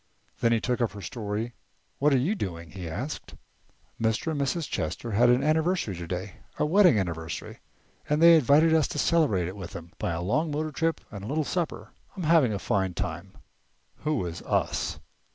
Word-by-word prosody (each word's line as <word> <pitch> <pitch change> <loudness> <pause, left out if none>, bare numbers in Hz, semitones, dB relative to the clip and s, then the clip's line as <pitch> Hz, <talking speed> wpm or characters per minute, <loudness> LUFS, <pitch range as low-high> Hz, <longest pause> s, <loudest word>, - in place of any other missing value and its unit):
Then 115 - +3
he 115 - +3
took 125 +2 -1
up 115 -5 0
her 100 - -8
story. 105 +5 -4 0.5
"What 150 +2 +4
are 135 - +5
you 145 +12 +1
doing?" 85 - -5
he 90 -3 -6
asked. 120 - -5 0.7
"Mr. 110 +8 0
and 145 -2 -1
Mrs. 145 +3 -1
Chester 95 +9 -3
had 120 +4 +4
an 125 +2 +4
anniversary 160 - +1
today, 90 +2 -5 0.2
a - - +1
wedding 180 - +5
anniversary, 80 -4 -4 0.5
and 150 +1 +2
they 170 +1 +8
invited 155 +2 +5
us 160 -3 +4
to - - -6
celebrate 140 - +2
it 95 - -6
with 95 -4 -8
them 85 0 -9
by 85 - -1
a 85 - -3
long 150 - +1
motor 155 +1 -2
trip 165 +3 -1
and 100 -2 -7
a - - -6
little 155 +5 0
supper. 170 +2 -3 0.3
I'm 185 - -3
having 155 -7 +4
a 100 - -1
fine 95 -2 -1
time." 85 +5 -5 0.6
"Who 150 -9 -1
is 85 -1 -5
us?" - - -1
120 Hz, 190 wpm, -27 LUFS, 95-155 Hz, 0.7 s, they